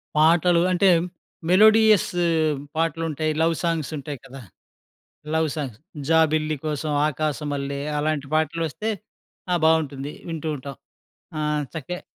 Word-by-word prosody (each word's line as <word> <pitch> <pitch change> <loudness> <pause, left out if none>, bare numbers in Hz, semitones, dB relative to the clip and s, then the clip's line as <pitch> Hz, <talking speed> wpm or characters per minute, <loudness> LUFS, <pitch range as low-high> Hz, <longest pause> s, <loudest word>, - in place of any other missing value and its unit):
పాటలు 170 +2 +4
అంటే 190 +1 +4 0.6
melodious 215 +1 +6 0.7
పాటలుంటాయి. 160 -1 -1
Love 165 0 +2
సాంగ్సుంటాయి 150 -4 -3
కదా! 135 0 -10 0.9
లవ్ 160 -1 +2
సాంగ్స్ 130 -8 -5 0.3
'జాబిల్లి 155 -1 +2
కోసం 150 0 -2 0.2
ఆకాశ 155 0 -2
మల్లే' 140 0 -3 0.2
అలాంటి 150 -2 -1
పాటలొస్తే 165 +6 -1 0.6
ఆ! - - +4
బావుంటుంది 150 -3 +1 0.2
వింటూ 160 -1 -4
ఉంటాం. 140 0 -8 0.6
ఆహ్, 150 -1 0
చక్క 160 +4 -5
155 Hz, 105 wpm, -23 LUFS, 145-165 Hz, 0.9 s, melodious